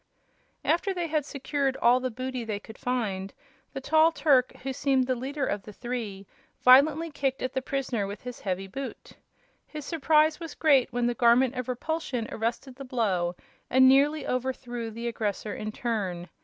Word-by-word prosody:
After 375 +3 +1
they 350 -1 -1
had 305 -3 -1
secured 275 -1 -1
all 245 +2 +4
the 255 0 -2
booty 255 +1 -4
they 215 -3 -3
could 220 +1 -13
find, 200 -6 -2 0.4
the 270 - -4
tall 315 +4 +4
Turk, 280 -5 +3
who 270 0 -2
seemed 265 -1 +2
the 255 - +1
leader 270 +3 -3
of 205 - -2
the 210 - -11
three, 220 -4 -5 0.4
violently 300 +6 +6
kicked 270 -1 -2
at 255 - -2
the 265 - -1
prisoner 255 -6 -2
with 200 +1 -8
his 250 -1 -7
heavy 190 -1 -3
boot. 265 +8 -7 0.6
His 300 -2 -8
surprise 310 0 +3
was 330 -3 -7
great 275 -5 +4
when 245 0 0
the 240 - +1
Garment 240 +1 +4
of 255 -1 -4
Repulsion 250 -3 -2
arrested 235 +3 -3
the 275 - -7
blow 195 -9 0 0.3
and 260 +1 +6
nearly 285 +3 +4
overthrew 250 -2 -3
the 230 +2 -5
aggressor 210 -2 -3
in 215 0 -5
turn. 195 -7 -3
255 Hz, 175 wpm, -27 LUFS, 230-275 Hz, 0.6 s, violently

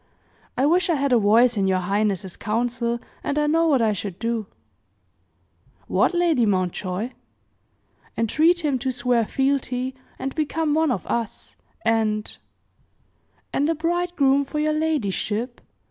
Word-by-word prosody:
I 265 - +3
wish 345 +3 +3
I 335 - +3
had 280 -2 +1
a 240 - +5
voice 225 +3 +4
in 195 -1 +2
your 190 -1 +2
highness's 195 0 -1
council, 235 +2 -1 0.2
and 285 - -2
I 300 - +2
know 330 +2 +3
what 270 -7 +3
I 215 -1 +2
should 195 -2 -5
do." 230 -2 -2 1.4
"What, - - +1
Lady 335 -8 +3
Mountjoy?" 185 +2 -1 1.1
"Entreat 315 +9 +2
him 275 -3 +1
to 260 +2 -1
swear 245 -3 +1
fealty, 265 -1 0 0.2
and 270 - -4
become 310 0 0
one 320 0 +2
of 250 - -2
us; 230 -3 -4 0.3
and 220 -1 +1 0.6
" - - -41
"And 290 +3 +1
a 330 - +1
bridegroom 330 -4 +1
for 280 +2 -6
your 305 0 +1
ladyship?" 245 -6 -1
250 Hz, 145 wpm, -23 LUFS, 215-300 Hz, 1.4 s, a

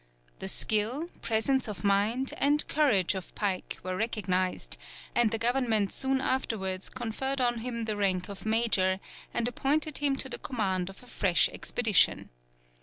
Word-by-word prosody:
The - - -4
skill, 235 +10 0
presence 230 +4 +1
of 210 -2 -6
mind, 210 +6 +1
and 295 +2 +3
courage 230 - +3
of 190 -2 -7
Pike 195 -3 -2
were 185 0 -3
recognized, 185 -4 -1 0.4
and 240 -2 +4
the 225 - 0
government 230 -4 +2
soon 265 0 +1
afterwards 205 -8 -1
conferred 260 +3 -3
on 240 -2 +1
him 235 -1 -4
the 215 -1 -1
rank 185 -3 +1
of 200 -1 -9
major, 220 -4 +2 0.3
and 235 - 0
appointed 290 +5 0
him 285 -2 +2
to 270 - 0
the 255 - -6
command 190 -7 -1
of 195 - -12
a - - -14
fresh 190 -7 +3
expedition. 220 -7 +2
225 Hz, 155 wpm, -29 LUFS, 195-260 Hz, 0.4 s, and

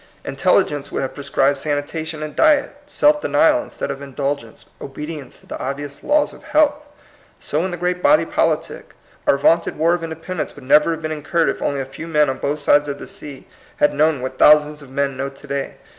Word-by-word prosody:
Intel - - +2
ligence 145 -1 -6
would - - -2
have 130 - -4
prescribed 140 -1 +1
sanitation 155 +2 -3
and 155 - -7
diet, 305 -3 +3
self 295 0 +3
denial 305 +1 +3
instead - - -5
of 135 - -7
indulgence, 140 -3 -4 0.2
obedience 150 +1 -8
to - - -22
the - - -7
obvious 140 0 -5
laws 295 0 +2
of - - -14
health. 300 -1 +1 0.5
So 155 +3 -2
in - - -2
the 175 - -5
great 180 +1 -1
body 300 +9 +4
politic. - - -2 0.3
Our 140 - +4
vaunted 165 +4 +2
War 165 +3 +3
of 175 -1 -2
Independence 165 +1 -5
would - - -13
never 150 +4 +5
have 160 0 -7
been 155 - -2
incurred 155 +2 0
if - - -4
only 140 -1 -1
a - - -4
few 135 +5 -9
men 150 -4 +2
on 130 - -7
both 145 +2 -1
sides 145 0 +3
of 140 -1 -4
the - - -9
sea 140 -3 -10 0.3
had 150 - +3
known 150 -2 +2
what 130 0 -5
thou 150 0 +9
sands 150 0 -8
of 140 - -13
men 140 0 -1
know 135 +1 -3
to 135 +1 -16
day. 140 -1 -3
150 Hz, 215 wpm, -20 LUFS, 140-170 Hz, 0.5 s, thou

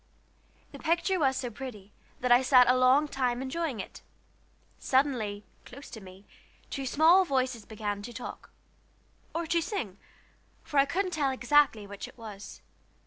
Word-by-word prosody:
The - - -11
picture 340 +3 +1
was 265 -3 +2
so 250 -2 -3
pretty 210 -4 -9 0.3
that 250 0 0
I 245 +1 +7
sat 255 -1 +6
a 250 - +5
long 255 +4 +4
time 250 -4 -1
enjoying 265 -1 -3
it. 190 - -8 0.8
Suddenly, 240 -7 0 0.2
close 275 +3 -12
to 220 - -9
me, 190 +1 -14 0.5
two 270 -1 -3
small 325 +8 +5
voices 255 - -1
began 205 -2 -4
to 240 - -8
talk 245 - -8 0.9
or 335 0 -1
to 335 +1 +1
sing, 235 - -4 0.6
for 290 - 0
I 275 - +6
couldn't 370 +4 -1
tell 300 -5 0
exactly 260 -4 +2
which 200 +4 -8
it 250 - -16
was. 210 -3 -10
255 Hz, 155 wpm, -29 LUFS, 220-290 Hz, 0.9 s, I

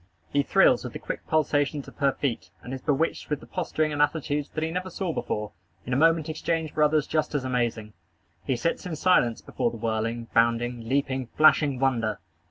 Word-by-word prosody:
He 145 - +4
thrills - - +4
with - - -6
the - - -4
quick - - -6
pulsations 145 -2 +1
of - - -13
her 140 -1 +3
feet, 120 -9 -3
and 125 - -7
is 130 - -5
bewitched 150 +3 0
with 150 -2 -1
the - - -13
posturing 155 -4 -1
and 145 - 0
attitudes 150 -1 0
that 155 - -3
he 160 - -1
never 180 +2 -3
saw 180 -1 -3
before, 105 -6 -3 0.3
in 125 - -3
a - - +2
moment 165 +2 +3
exchanged 160 0 -2
for 155 - -1
others 150 -1 +3
just 155 -1 -1
as 140 - 0
amazing. 120 -4 -1 0.5
He 130 - 0
sits 165 +8 -2
in 165 - -4
silence 145 -8 +3
before 125 -2 -1
the 115 - -8
whirling, 115 +1 -2
bounding, 115 0 +1
leaping, 130 -2 0
flashing 150 -3 +5
wonder. 115 -6 +1
140 Hz, 200 wpm, -26 LUFS, 120-155 Hz, 0.5 s, flashing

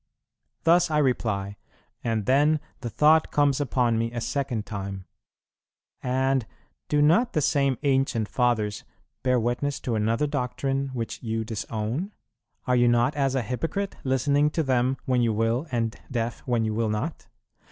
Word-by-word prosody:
Thus 170 +1 +4
I 155 - +1
reply, 105 -8 0 0.5
and 110 -3 -1
then 145 +4 +3 0.2
the 120 -3 -4
thought 155 +6 +4
comes 145 -1 +2
upon 120 -4 +1
me 115 0 -1
a 120 - -4
second 125 -3 -2
time, 95 -2 -6 1.0
"And 130 -1 +1 0.4
do 150 0 +3
not 180 +12 +3
the 155 - +2
same 140 -2 +2
ancient 135 -5 +1
Fathers 110 -5 0 0.4
bear 125 -1 +2
witness 120 +5 -1
to 120 - -2
another 110 +5 +1
doctrine, 135 0 -1
which 115 -3 -4
you 115 -1 -2
disown? 115 - -3 0.5
Are 125 - +2
you 120 0 +4
not 120 +3 +3
as 135 -2 +1
a 130 - +1
hypocrite, 165 - -3
listening 140 +3 +2
to 160 +1 -1
them 130 -1 +1
when 130 -3 +2
you 115 -2 +2
will, 115 +7 0
and 115 -2 -1
deaf 120 -2 -2
when 120 -3 +1
you 110 - -1
will 110 0 0
not? 110 +10 -3
125 Hz, 155 wpm, -26 LUFS, 115-140 Hz, 1.0 s, Thus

